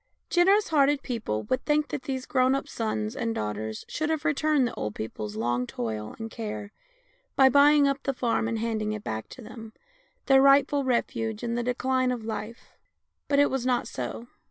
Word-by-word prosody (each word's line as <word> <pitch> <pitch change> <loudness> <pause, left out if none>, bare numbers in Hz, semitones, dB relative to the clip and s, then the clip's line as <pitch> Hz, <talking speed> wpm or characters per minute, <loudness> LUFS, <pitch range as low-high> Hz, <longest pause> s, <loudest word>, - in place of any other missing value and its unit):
Generous 390 +4 +4
hearted 290 -2 +3
people 220 - -3
would 255 0 -1
think 295 -1 +1
that - - -4
these 260 -1 -3
grown 260 -1 +2
up 275 - -3
sons 215 0 -3
and 230 -4 -2
daughters 105 +1 -4
should 310 0 -2
have 315 -1 -1
returned 300 -3 +2
the - - -6
old 105 0 -4
people's 105 -1 -5
long 120 +3 -1
toil 110 -2 -4
and 225 0 -6
care 210 -3 -6 0.6
by 265 -1 +6
buying 285 +1 +6
up 275 0 -1
the 275 - -1
farm 240 -3 0
and 230 0 -2
handing 220 -1 -2
it 210 -1 -6
back 110 0 -5
to 250 - -11
them, 220 0 -10 0.5
their 270 -2 +6
rightful 275 +1 +5
refuge 235 -3 -1
in 235 -1 -2
the 240 - 0
decline 255 +1 0
of 235 -3 -4
life. 220 +1 -6 0.5
But 285 - +2
it 285 0 +4
was 265 -2 -1
not 250 -1 0
so. 235 - -5
245 Hz, 190 wpm, -27 LUFS, 215-275 Hz, 0.6 s, by